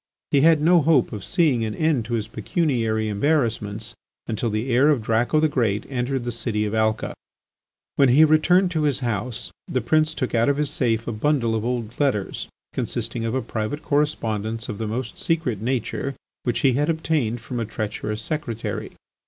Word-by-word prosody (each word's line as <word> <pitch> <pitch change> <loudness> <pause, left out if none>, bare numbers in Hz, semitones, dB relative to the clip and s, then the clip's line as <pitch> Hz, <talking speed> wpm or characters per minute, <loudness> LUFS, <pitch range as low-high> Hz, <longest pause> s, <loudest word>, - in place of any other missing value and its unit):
He 140 - +4
had 160 0 +5
no 170 +1 +6
hope 155 -4 +3
of 105 -3 -5
seeing 145 -9 +2
an 110 -1 -3
end 155 -8 +1
to 120 +1 -2
his 110 -2 -2
pecuniary 115 - 0
embarrassments 110 -2 0 0.3
until 115 +1 -1
the 110 +4 -2
heir 135 +5 +5
of 140 -7 +2
Draco 115 +7 +2
the 155 - +4
Great 115 -8 0
entered 130 0 -1
the 120 - -2
city 110 -2 -2
of 105 - -3
Alca. 110 0 0 0.8
When 135 -2 +5
he 145 +6 +7
returned 175 +4 +4
to 160 -3 0
his 145 -3 +1
house, 120 0 -3 0.2
the 130 - 0
prince 155 +6 +2
took 130 - -2
out 115 +2 +3
of 140 - +1
his 150 -1 0
safe 115 -6 0
a - - -1
bundle 115 0 +1
of 110 -1 -1
old 120 -1 -3
letters 130 -9 0 0.3
consisting 115 - -2
of 115 +2 -1
a 130 - 0
private 115 +6 -3
correspondence 115 -6 -1
of 105 - -5
the 110 - -2
most 115 +1 -4
secret 130 -11 -1
nature, 130 +3 -2 0.3
which 120 -2 0
he 135 -2 +4
had 145 +5 +1
obtained 155 -8 0
from 120 +2 -5
a 115 - -1
treacherous 105 0 -4
secretary. 120 -6 -4
120 Hz, 185 wpm, -23 LUFS, 110-145 Hz, 0.8 s, he